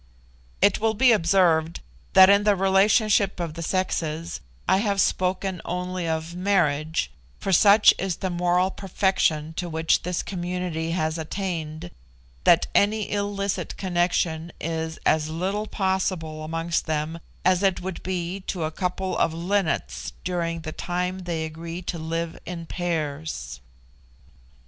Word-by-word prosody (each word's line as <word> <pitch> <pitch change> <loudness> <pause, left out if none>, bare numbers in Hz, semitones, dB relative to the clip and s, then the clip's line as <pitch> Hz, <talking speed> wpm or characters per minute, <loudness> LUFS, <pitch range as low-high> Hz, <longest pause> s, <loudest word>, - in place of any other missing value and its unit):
It 200 - +4
will 220 0 +1
be 255 +3 +5
observed 170 -4 +3 0.3
that 190 0 +9
in 200 +1 +5
the 205 -1 +4
relationship 195 +1 +3
of 170 -3 -3
the 170 - -7
sexes 165 - -2 0.3
I - - +4
have 200 -1 0
spoken 185 -1 0
only 180 0 -3
of 160 +1 -2
marriage, 160 - +1 0.3
for 195 - -2
such 205 +3 +7
is 190 -1 -1
the 190 +1 -3
moral 180 +2 +2
perfection 180 -5 0
to 175 -1 -3
which 160 0 +2
this 180 0 -2
community 175 -3 -3
has 160 -1 -1
attained, 165 -1 -4 0.5
that 170 - +6
any 210 +1 +2
illicit 200 -1 -2
connection 175 -3 0
is 160 0 -3
as 155 0 +2
little 190 +6 -2
possible 185 -6 -1
amongst 165 +2 -2
them 155 +1 -2 0.3
as 185 0 +4
it 195 -2 +2
would 185 -2 -5
be 180 0 -3
to 175 -4 -2
a 155 - -1
couple 185 +2 -2
of 160 - +1
linnets 165 - -1
during 170 -2 -2
the 155 -1 -5
time 180 +3 -3
they 170 -3 -3
agree 165 +3 -7
to 170 -1 -4
live 165 +1 -3
in 170 -1 -5
pairs. 155 - -3
175 Hz, 140 wpm, -25 LUFS, 160-190 Hz, 0.5 s, that